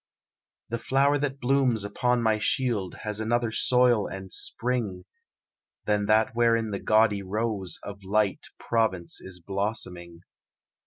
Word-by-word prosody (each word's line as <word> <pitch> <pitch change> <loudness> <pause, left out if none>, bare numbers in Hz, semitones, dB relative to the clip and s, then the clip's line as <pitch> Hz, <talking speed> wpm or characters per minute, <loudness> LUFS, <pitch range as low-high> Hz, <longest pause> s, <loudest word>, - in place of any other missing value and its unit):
"The 115 0 -3
flower 140 +4 +2
that 140 -1 -2
blooms 125 -4 +2
upon 120 +4 0
my 110 -1 +2
shield 110 -6 0
It - - -13
has 105 -1 -3
another 115 +1 0
soil 125 -1 +3
and 95 -1 -8
spring 115 -7 0 0.8
Than 105 -1 +1
that 110 +3 +3
wherein 115 -2 +2
the 100 - -3
gaudy 110 -2 +3
rose 100 -1 -2
Of 100 -1 -9
light 100 +1 0
Provence 105 -7 -1
is 90 -1 -8
blossoming. 90 -3 -4
110 Hz, 135 wpm, -26 LUFS, 100-120 Hz, 0.8 s, soil